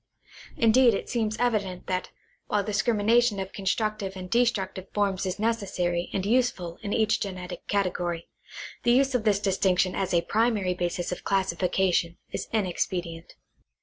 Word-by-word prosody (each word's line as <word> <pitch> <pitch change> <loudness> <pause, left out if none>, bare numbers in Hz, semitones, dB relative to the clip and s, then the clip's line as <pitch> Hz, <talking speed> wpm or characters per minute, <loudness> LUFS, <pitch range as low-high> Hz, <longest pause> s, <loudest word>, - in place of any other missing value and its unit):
Indeed 235 0 +5
it - - -5
seems 220 -3 -1
evident 205 -7 -1
that 185 0 -2 0.4
while 205 -1 +1
discrimination 215 +1 +2
of 190 0 -5
constructive 200 0 -1
and 185 0 -8
destructive 210 -6 0
forms 200 -2 0
is 185 - -3
necessary 190 -6 -1
and 195 -1 -2
useful 210 -7 0
in 205 - -4
each 220 0 +2
genetic 185 -2 -6
cate 200 -3 +1
gory, 170 -1 -3 0.5
the 240 - +3
use 270 +1 +3
of 240 -3 0
this 205 -2 +3
distinction 185 -2 +2
as 190 - -2
a 170 -1 +3
primary 215 -4 +1
basis 175 0 -2
of 180 - -5
classifi 190 -2 0
cation 175 -3 +1
is - - -4
inexpedient. 175 -4 -2
195 Hz, 150 wpm, -27 LUFS, 180-220 Hz, 0.5 s, Indeed